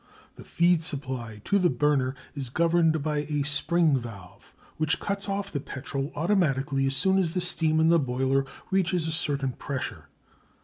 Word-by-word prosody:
The - - -11
feed 170 -1 +2
supply 130 -8 -3
to 200 - +3
the 180 -2 +3
burner 135 0 +1 0.2
is 135 -4 -4
governed 165 +1 +2
by 150 -1 -1
a 145 -1 -1
spring 150 +1 +2
valve, 105 -6 -11 0.3
which 155 -1 +1
cuts 200 0 -3
off 195 0 -2
the 145 - -2
petrol 135 +1 -5
automatically 145 -6 +1
as 135 - 0
soon 190 +6 +2
as 175 -2 -1
the - - +2
steam 160 -3 +1
in 160 +1 +4
the 170 0 +5
boiler 135 0 +1 0.3
reaches 180 -3 +1
a - - -1
certain 140 -4 -1
pressure. 135 +1 -5
150 Hz, 170 wpm, -27 LUFS, 135-170 Hz, 0.3 s, the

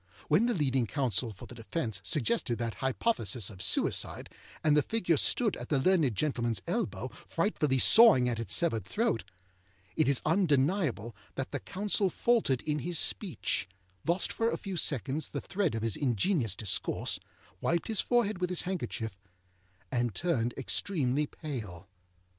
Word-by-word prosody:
When 195 +11 +4
the 240 - +1
leading 135 -7 +1
counsel 125 -4 0
for 100 - -11
the - - -11
defence 115 - -3
suggested 120 - 0
that 115 -1 -3
hypothesis 130 - -1
of 95 -3 -9
suicide, - - -1 0.3
and 150 -1 +4
the 150 - +5
figure 175 -1 +1
stood 215 - +2
at - - -8
the 145 - +2
learned 150 - +2
gentlemanâs 120 -5 0
elbow, - - -2
frightfully 135 -3 -1
sawing 200 - +8
at 120 -2 -1
its 115 - -1
severed 155 - +1
throat, 205 - -1 0.7
it - - +2
is 140 - +3
undeniable 150 - +1 0.2
that 135 - -4
the 145 - -3
counsel 200 - 0
faltered 210 - +1
in 150 -1 -1
his 170 +5 -3
speech, 185 - -1 0.3
lost 175 +2 0
for 230 0 +1
a - - -2
few 195 -2 -6
seconds 145 -1 -1
the - - -4
thread 185 - -1
of 115 - -3
his 115 -4 0
ingenious 130 - 0
discourse, 105 -4 0 0.4
wiped 170 0 0
his 220 -3 +1
forehead 215 -6 +1
with 180 - 0
his 180 - +1
handkerchief, 120 - -4 0.7
and 120 -4 -1
turned 125 -9 0
extremely 145 0 0
pale. 105 - -7
145 Hz, 155 wpm, -30 LUFS, 120-180 Hz, 0.7 s, sawing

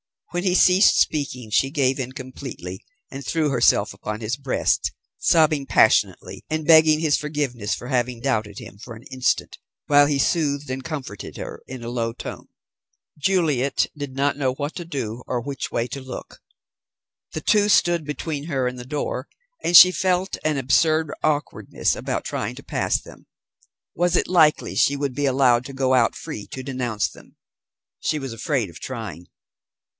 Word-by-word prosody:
When 175 0 -2
he 180 -2 +2
ceased 185 +2 +5
speaking, 125 -7 0
she 135 +5 +3
gave 135 -2 +1
in 130 0 -4
completely, 130 -8 -8 0.3
and 135 +1 -7
threw 155 +2 0
herself 125 -3 +3
upon 105 +1 -6
his 115 +2 -2
breast, 135 -2 0 0.3
sobbing 155 -4 +3
passionately, - - +2
and 155 0 -2
begging 160 -1 +6
his 155 -3 +3
forgiveness 145 -8 -2
for 125 - -9
having 125 -2 -1
doubted 110 -7 -1
him 100 - -10
for 120 +1 -9
an 115 - -13
instant, 130 -1 -1 0.3
while 145 0 +6
he 145 -1 +1
soothed 145 -2 0
and 130 0 -4
comforted 140 - -6
her - - -7
in 130 -2 -8
a 115 - -5
low 115 -1 -2
tone. - - -8 0.7
Juliet 150 -5 +1
did 145 -3 -6
not 140 +1 +1
know 130 -3 0
what 145 +3 -4
to 175 - -6
do 125 -7 -4
or 125 - -1
which 140 +2 -5
way 115 - -1
to 140 - -6
look. 130 -1 -9 0.9
The 155 - -4
two 205 +4 +3
stood 175 -5 +3
between 150 0 -4
her 135 -6 -1
and 125 0 -5
the 125 - -8
door, 140 -1 -3 0.3
and 175 - +1
she 180 +2 +11
felt 185 +1 0
an 155 -2 +1
absurd 155 +3 +2
awkwardness 150 -1 -1
about - - -3
trying - - -4
to - - -11
pass - - 0
them. - - -15 0.7
Was 175 +1 +1
it - - +1
likely 160 -4 +3
she 140 - +3
would 140 -2 -2
be 145 +2 -1
allowed 125 -2 +3
to 135 - -8
go 130 -1 +1
out 120 -3 +3
free 105 - -7
to 130 - -7
denounce 125 -6 -2
them? - - -17 0.6
She 155 - -1
was 135 -5 -5
afraid 115 - -1
of 85 - -12
trying. 110 -9 -7
140 Hz, 175 wpm, -23 LUFS, 125-155 Hz, 0.9 s, she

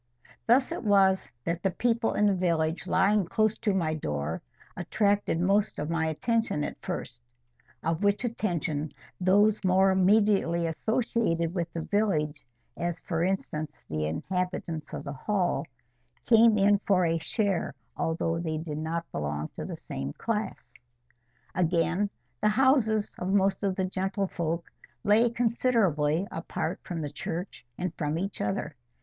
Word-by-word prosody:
Thus 250 +3 +4
it - - -4
was 195 -5 +4
that 170 +1 -2
the 195 - +2
people 230 +4 0
in 210 - +3
the 205 - +4
village 165 -3 0
lying 205 +1 +3
close 215 +5 +1
to 215 - +1
my 170 -5 0
door 75 - -3 0.3
attracted 205 -5 +1
most 200 +4 +2
of 150 +2 -3
my 160 -1 +1
attention 220 0 0
at - - -3
first; 120 -1 -5 0.6
of 165 +4 -1
which 205 +3 +2
attention 165 -10 -2 0.3
those 200 +4 +4
more 190 +1 +4
immediately 190 -3 +3
associated 170 -2 0
with 170 -3 -2
the 165 - -4
village, 160 -8 0 0.3
as, 175 0 -2
for 165 -2 -1
instance, 155 -5 -2
the 75 0 -1
inhabitants 175 - -3
of - - -5
the 140 -1 -5
Hall, 175 -1 -1 0.6
came 225 -2 +6
in 200 0 +4
for 190 -3 +2
a 165 0 +1
share, 195 - 0 0.2
although 165 0 -1
they 160 -2 -2
did 155 -1 -4
not 165 +2 -2
belong 75 0 -3
to - - -7
the - - -6
same 70 +1 -5
class. 220 -2 -3 0.8
Again, 175 +3 +1 0.3
the 210 - +4
houses 220 -3 +3
of 180 +1 -2
most 195 -1 +2
of 195 -2 0
the 190 - 0
gentlefolk 185 -3 -2 0.4
lay 220 +4 +4
considerably 220 - +1
apart - - -3
from 170 -3 -5
the 145 -2 -4
church 165 -3 -5
and 180 -2 -2
from 150 +1 -1
each 195 +2 -3
other. 105 -1 -2
185 Hz, 145 wpm, -28 LUFS, 160-205 Hz, 0.8 s, came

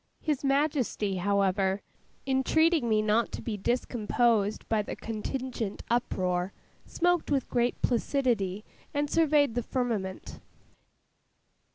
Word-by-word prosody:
His 300 -4 -1
Majesty, 275 -8 +1
however, 195 0 +1 0.4
entreating 275 +1 +2
me 215 -1 +3
not 215 +2 +2
to - - -5
be 225 - -3
discomposed 225 -1 0
by 220 -2 +2
the 205 - -5
contingent 225 -1 -4
uproar, 185 -6 0 0.3
smoked 355 -1 +1
with 275 -3 +1
great 240 0 0
placidity, 230 -6 0 0.3
and 290 0 0
surveyed 300 -5 +3
the 245 - 0
firmament. 225 -7 -3
235 Hz, 105 wpm, -29 LUFS, 205-275 Hz, 0.4 s, me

